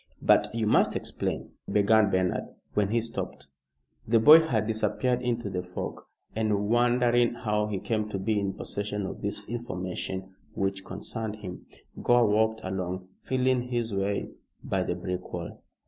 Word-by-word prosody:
"But -, -, +4 dB
you 115 Hz, -1 st, -1 dB
must 105 Hz, -, +3 dB
explain," -, -, -3 dB, 0.2 s
began 105 Hz, 0 st, +4 dB
Bernard, 95 Hz, -1 st, -1 dB, 0.2 s
when 105 Hz, -1 st, +2 dB
he 115 Hz, +2 st, +2 dB
stopped. 115 Hz, -10 st, -5 dB, 0.6 s
The 115 Hz, +1 st, +4 dB
boy 150 Hz, +8 st, +10 dB
had 120 Hz, -10 st, 0 dB
disappeared 120 Hz, +3 st, 0 dB
into 120 Hz, -3 st, -1 dB
the 95 Hz, -2 st, -2 dB
fog, 90 Hz, 0 st, -6 dB, 0.3 s
and 105 Hz, -2 st, +1 dB
wondering 120 Hz, 0 st, +3 dB
how 105 Hz, -3 st, 0 dB
he 105 Hz, -2 st, -2 dB
came 110 Hz, +2 st, -1 dB
to 100 Hz, -, -3 dB
be 105 Hz, +2 st, 0 dB
in 100 Hz, -1 st, -1 dB
possession 100 Hz, 0 st, -4 dB
of -, -, -6 dB
this 100 Hz, 0 st, -3 dB
information 95 Hz, -4 st, -4 dB, 0.2 s
which 95 Hz, 0 st, -1 dB
concerned 110 Hz, +3 st, -5 dB
him, 95 Hz, -4 st, -9 dB, 0.3 s
Gore 120 Hz, -1 st, +5 dB
walked 110 Hz, +1 st, +2 dB
along 95 Hz, -1 st, -4 dB
feeling 130 Hz, -1 st, +1 dB
his 120 Hz, -3 st, -1 dB
way 100 Hz, +1 st, -1 dB, 0.3 s
by 95 Hz, -, 0 dB
the 90 Hz, -, -1 dB
brick 90 Hz, 0 st, -5 dB
wall. 85 Hz, -2 st, -6 dB
105 Hz, 155 wpm, -28 LUFS, 95-115 Hz, 0.6 s, boy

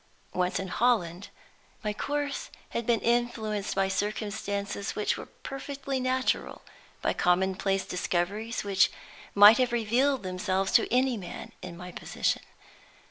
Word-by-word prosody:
Once 180 Hz, 0 st, 0 dB
in 190 Hz, -, -3 dB
Holland, 200 Hz, -6 st, +1 dB, 0.5 s
my 210 Hz, -1 st, -1 dB
course 290 Hz, +4 st, -2 dB, 0.2 s
had 235 Hz, -, -3 dB
been 235 Hz, -3 st, +3 dB
influenced 225 Hz, -3 st, 0 dB
by 195 Hz, 0 st, +2 dB
circumstances 205 Hz, 0 st, -2 dB
which 210 Hz, -, +1 dB
were -, -, -8 dB
perfectly 275 Hz, 0 st, -5 dB
natural, 255 Hz, 0 st, 0 dB, 0.4 s
by -, -, +2 dB
commonplace 190 Hz, +2 st, +1 dB
discoveries 190 Hz, +5 st, -1 dB
which 195 Hz, -1 st, +4 dB, 0.5 s
might 205 Hz, +4 st, +9 dB
have 250 Hz, -1 st, +2 dB
revealed 240 Hz, +3 st, +2 dB
themselves 190 Hz, +1 st, -1 dB
to -, -, +4 dB
any 255 Hz, 0 st, +3 dB
man 185 Hz, -4 st, -7 dB
in 175 Hz, -2 st, -8 dB
my 180 Hz, 0 st, -8 dB
position. -, -, -1 dB
210 Hz, 130 wpm, -28 LUFS, 190-240 Hz, 0.5 s, might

